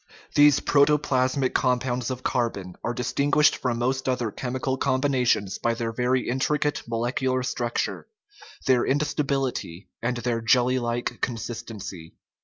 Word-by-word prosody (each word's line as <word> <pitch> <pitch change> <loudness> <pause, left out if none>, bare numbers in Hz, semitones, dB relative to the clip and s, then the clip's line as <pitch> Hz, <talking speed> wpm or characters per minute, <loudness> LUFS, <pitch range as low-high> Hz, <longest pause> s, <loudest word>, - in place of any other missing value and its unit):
These 145 -1 +6
protoplasmic 140 -2 +2
compounds 125 -1 0
of 130 0 -5
carbon 100 -7 -2
are 120 - -1
distinguished 145 +4 +2
from 125 -2 -1
most 130 +2 -1
other 120 -4 -1
chemical 130 +2 -2
combinations 130 -7 +1
by 115 0 0
their 115 0 -2
very 125 +2 0
intricate 145 +3 0
molecular 125 +3 -1
structure, 120 -2 -2 0.6
their 130 -2 +4
insta 150 +2 0
bility, 130 -10 -3
and 120 +1 -1
their 120 -1 -1
jelly 125 +2 +3
like 120 0 -3
consistency. 115 -7 -5
125 Hz, 125 wpm, -25 LUFS, 120-130 Hz, 0.6 s, These